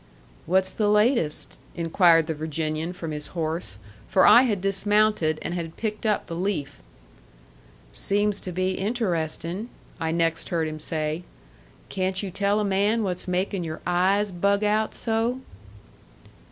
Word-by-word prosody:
"What's 190 +2 +2
the 210 - 0
latest?" 210 - +2 0.2
inquired 165 -1 +4
the 160 - -2
Virginian 155 +1 -3
from 165 -3 -6
his 150 -1 -5
horse. 160 - -2 0.3
For 190 -1 +4
I 240 - +9
had 225 -7 +1
dismounted, 195 -3 +2
and - - -3
had 170 -2 -5
picked 215 0 -3
up 210 - +1
the 165 - -6
leaf. 175 - -3 1.1
"Seems 205 0 +2
to 185 - -5
be 185 +2 0
interesting," 190 -1 -2 0.3
I 160 0 -1
next 165 -1 0
heard 165 -2 0
him 155 0 -6
say. 155 +1 -2 0.7
"Can't 190 0 -1
you 195 - -4
tell 200 +2 +1
a 210 - 0
man 205 +3 +1
what's 180 -2 -3
making 185 +1 -1
your 155 -1 -5
eyes 190 +3 +2
bug 200 +3 +1
out 215 +1 +1
so?" 230 +2 0
185 Hz, 145 wpm, -25 LUFS, 165-205 Hz, 1.1 s, I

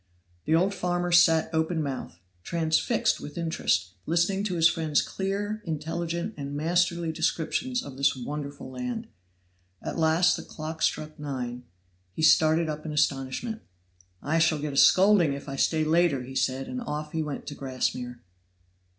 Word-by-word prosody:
The 160 - +3
old 185 +4 +2
farmer 175 -1 -1
sat 165 -2 +5
open 160 0 0
mouthed, 135 - -5 0.2
transfixed 170 - +1
with 150 - -8
interest, 160 - 0 0.2
listening 175 +5 +1
to 185 -4 -1
his 165 -1 +6
friend's 160 -4 +1
clear, 205 +2 -2
intelligent 165 +4 -3
and 140 0 -5
masterly 170 +1 +1
descriptions 165 +10 -1
of 135 -2 -9
this 140 0 +3
wonderful 140 +1 -6
land. 235 - -5 0.7
At - - -5
last 160 +2 +4
the - - -6
clock 160 +1 -7
struck 155 +1 -1
nine; 125 -4 -5 0.5
he 160 - -4
started 160 +1 +5
up 155 0 -4
in 155 - -5
astonishment. 145 - -1 0.6
"I 160 +4 +1
shall 160 -1 +3
get 150 -1 -4
a - - -4
scolding 185 -3 +6
if 140 +1 -7
I 135 - -4
stay 155 +3 +2
later," 155 -4 +2
said 130 0 0
he, - - -8
and 255 - -4
off 150 -9 -4
he 160 - -1
went 150 -2 -5
to 145 - -6
Grassmere. 125 -3 -3
160 Hz, 160 wpm, -27 LUFS, 145-175 Hz, 0.7 s, his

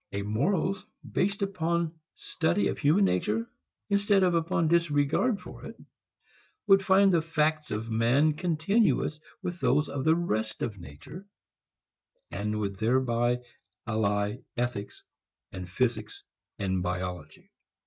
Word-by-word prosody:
A 100 0 -2
morals 165 - 0 0.3
based 200 0 0 0.2
on 170 0 0 0.2
study 170 +5 0
of - - -4
human 165 +8 +4
nature 110 - 0 0.4
instead 200 -1 +3
of 180 -1 +3
upon 165 0 +1
disregard 170 - +2
for 180 - -11
it - - -9 0.9
would 195 -2 +5
find 195 0 +5
the 170 - +4
facts 155 -1 0
of 110 +2 -4
man 125 +8 +3
continuous 170 0 +1 0.2
with 175 0 -4
those 150 0 +2
of 140 -2 -3
the 160 +2 +4
rest 110 -11 -2
of 105 -4 -4
nature 110 - -11 1.0
and 105 +1 -2
would 100 -2 -3
thereby 120 +1 +1 0.4
ally 105 -1 0 0.2
ethics 120 -4 -3 0.5
with 90 -1 -7
physics 110 +1 -2 0.3
and 95 -2 -1
biology. 90 -3 -5
145 Hz, 125 wpm, -28 LUFS, 105-170 Hz, 1.0 s, would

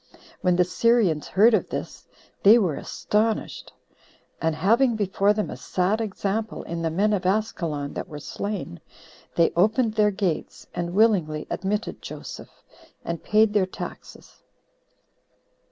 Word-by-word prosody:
When 180 -1 +3
the 180 - +4
Syrians 190 -4 +2
heard 220 +5 +5
of - - +1
this, - - -6 0.3
they 210 +4 +8
were 185 -9 +1
astonished; 215 +1 -2 0.7
and 160 -1 +1
having 230 +8 +3
before 200 -1 +2
them 210 0 -1
a - - -5
sad 190 +5 0
example 215 +1 -3
in 170 0 -5
the 165 - 0
men 200 +6 +1
of 195 - 0
Askelon 170 -8 -1
that - - -5
were 155 -4 -8
slain, 195 - -5 0.6
they 170 - +4
opened 220 +5 +2
their 210 -1 +3
gates, 190 -5 -3
and 175 +1 -3
willingly 180 -9 +2
admitted 210 +3 -2
Joseph, - - -9 0.4
and 170 -1 -4
paid 215 0 +3
their 200 -3 +2
taxes. - - -10
200 Hz, 135 wpm, -24 LUFS, 175-215 Hz, 0.7 s, they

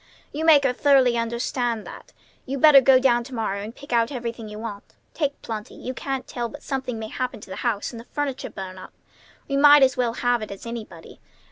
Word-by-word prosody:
You 310 +2 -3
make 300 -3 +7
her 260 -2 +2
thoroughly 265 -3 +4
understand 235 0 -2
that. - - -11 0.4
You 275 +2 -3
better 280 0 +8
go 265 0 +6
down 245 -2 +3
to 260 0 -8
morrow 200 -3 -2
and 220 +4 -8
pick 280 -3 -8
out 230 +1 +2
everything 235 -4 -5
you 210 - -8
want. 215 -2 -8 0.2
Take 290 -2 -2
plenty. 215 -2 -6
You 255 - -6
can't 270 +1 -4
tell 240 -1 -4
but 290 +3 -11
something 260 -4 -3
may 220 0 -6
happen 255 -1 -4
to 200 - -12
the - - -6
house, 230 -5 -2
and 230 - -8
the 230 - -11
furniture 290 -2 -4
burn 185 -1 -8
up. - - -12 0.5
We 275 - -1
might 290 0 +8
as 260 -1 +3
well 240 -2 0
have 245 -2 +1
it 215 - -6
as 200 +2 -9
anybody. 220 -8 -9
245 Hz, 225 wpm, -24 LUFS, 225-270 Hz, 0.5 s, better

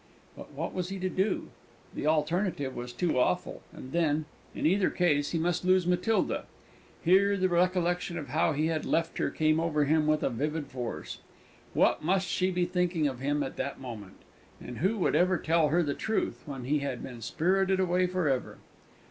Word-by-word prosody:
But - - -11
what - - -4
was 180 -1 -3
he 195 - -4
to 185 0 -2
do? 190 +2 -1 0.4
The 150 - -3
alternative 155 -2 0
was 120 0 -5
too 155 +1 0
awful; - - 0
and 130 - -10
then, 155 -2 +1 0.3
in - - -2
either 190 +4 +3
case, 145 -5 +1
he 170 - -1
must 175 +2 0
lose 185 0 +3
Matilda. 180 +5 +1 0.6
Here 200 +3 +4
the 185 0 +2
recollection 175 0 +1
of 145 -5 -6
how 160 +3 +2
he 150 +2 0
had 160 -1 -1
left 165 0 -1
her - - +1
came 155 0 +2
over 155 -3 +1
him 155 +1 +2
with 155 0 +2
a - - +1
vivid 150 +5 -2
force. 125 -3 -6 0.6
What - - +3
must 185 +3 +1
she 185 +2 +1
be 180 -1 0
thinking 175 -3 0
of 130 -3 -4
him 145 +2 0
at 135 - -6
that 140 +1 -3
moment? 110 -7 -8 0.4
And 125 - -8
who 195 +7 +1
would 185 - +1
ever 185 0 +3
tell 165 -1 +2
her 170 +4 +2
the 145 -2 -1
truth, 220 +7 -2
when 135 -3 -6
he 145 +4 +1
had 140 -3 -4
been 120 -3 -8
spirited 190 - +1
away 180 0 +2
for 180 -3 -1
ever? 135 -2 -1
165 Hz, 195 wpm, -29 LUFS, 145-180 Hz, 0.6 s, Here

